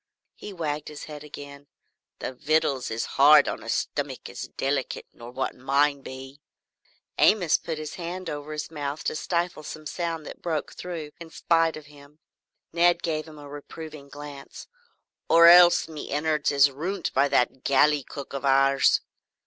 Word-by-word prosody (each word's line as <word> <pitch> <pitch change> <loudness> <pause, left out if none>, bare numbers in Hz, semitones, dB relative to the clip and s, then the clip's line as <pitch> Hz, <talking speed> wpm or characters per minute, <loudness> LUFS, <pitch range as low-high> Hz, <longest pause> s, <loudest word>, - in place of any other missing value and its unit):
He 210 - -9
wagged 155 -5 -4
his 150 -1 -8
head 150 -1 -9
again. 145 -1 -11 0.5
"The - - -5
vittles 140 -1 0
is 115 +1 -2 0.2
hard 150 0 +8
on - - -3
a - - -9
stummick - - -3
as - - -7
delikit 135 -1 -2
nor 120 0 -11
what 130 +2 -3
mine 140 +2 +1
be 135 +2 -10 0.4
" - - -38
Amos 180 -7 +4
put 160 -2 -5
his 155 -1 -6
hand 180 +2 -5
over 145 0 -5
his 150 +1 -5
mouth 145 -1 -4
to - - -2
stifle 170 0 -2
some 155 +1 -9
sound 165 -1 -4
that - - -10
broke 160 -3 -3
through 165 -4 -6
in 170 -1 -10
spite 165 0 +1
of 155 - -11
him. 145 0 -17 0.6
Ned 175 0 +3
gave 155 -2 -2
him 155 -1 -12
a 145 -1 -11
reproving 145 0 -10
glance. 145 -1 -10 0.6
"Or 170 0 +7
else, 175 0 +8
me 155 -2 -8
innards 150 0 0
is 140 0 +5
ruint 175 +7 -4
by 140 - +3
that 130 -1 +1
galley 145 +2 +3
cook 140 +1 -9
of 140 - -4
ours." 135 0 +4
150 Hz, 170 wpm, -26 LUFS, 140-160 Hz, 0.6 s, hard